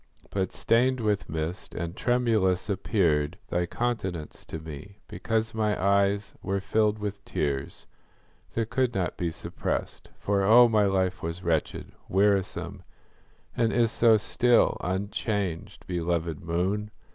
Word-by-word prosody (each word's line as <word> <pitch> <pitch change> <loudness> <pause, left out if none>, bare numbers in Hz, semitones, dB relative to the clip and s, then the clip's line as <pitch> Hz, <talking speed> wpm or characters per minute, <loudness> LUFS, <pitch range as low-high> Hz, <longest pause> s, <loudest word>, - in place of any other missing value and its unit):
But 95 -2 -1
stained 125 +3 +2
with 105 -5 0
mist, 80 +3 -4
and 85 +1 -4
tremulous, 110 -7 +1
appeared 90 -6 +1
Thy 85 0 0
countenance 95 -9 -3
to - - -6
me, 80 +6 -9
because 110 0 -2
my 105 -1 0
eyes 100 +1 +2
Were 95 +1 -1
filled 105 +2 +1
with 105 -1 -5
tears, 70 -2 -3 0.7
that 115 -1 -2
could 130 -2 +1
not 95 -3 -1
be 85 - -1
suppressed; 80 - -4
For, 100 -1 0
oh, 115 +5 +7
my 110 -3 +3
life 95 -2 0
was 85 +2 -4
wretched, 80 -3 -1 0.2
wearisome, 100 0 +1 0.7
And 115 -1 +2
is 115 -2 +2
so 115 -2 +5
still, 120 +3 +3
unchanged, 95 -1 -3
belovèd 85 -2 -1
moon! 95 +5 -1
100 Hz, 130 wpm, -27 LUFS, 85-110 Hz, 0.7 s, oh